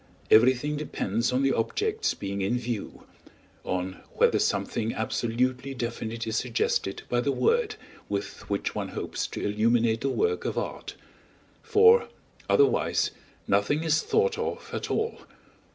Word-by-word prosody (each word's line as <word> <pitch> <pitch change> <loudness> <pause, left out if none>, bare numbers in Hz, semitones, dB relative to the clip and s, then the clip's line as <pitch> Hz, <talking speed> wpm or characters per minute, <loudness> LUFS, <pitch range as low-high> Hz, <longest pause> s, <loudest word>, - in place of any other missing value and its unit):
Everything 130 +6 +5
depends 115 -5 -1
on 130 +2 +1
the 135 -1 +3
objects 430 - 0
being 100 0 -4
in 100 +6 +1
view; 120 -3 -5 0.6
on 95 0 -3
whether - - +4
something 115 0 -1
absolutely 125 +4 -1
definite 115 -1 -4
is 110 -1 -2
suggested 115 -4 -1
by 120 0 +1
the 140 - +1
word 455 - +1 0.3
with 100 0 -4
which - - -1
one - - -3
hopes - - -4
to - - -5
illuminate 115 +2 +2
the 135 - 0
work 440 - 0
of - - -3
art; - - -4 0.7
for, 450 +1 +5 0.4
otherwise, 420 -1 +3 0.4
nothing 150 +2 +2
is 160 -1 +2
thought 450 +1 +1
of - - -4
at - - -3
all. 450 +1 -1
125 Hz, 135 wpm, -27 LUFS, 110-160 Hz, 0.7 s, Everything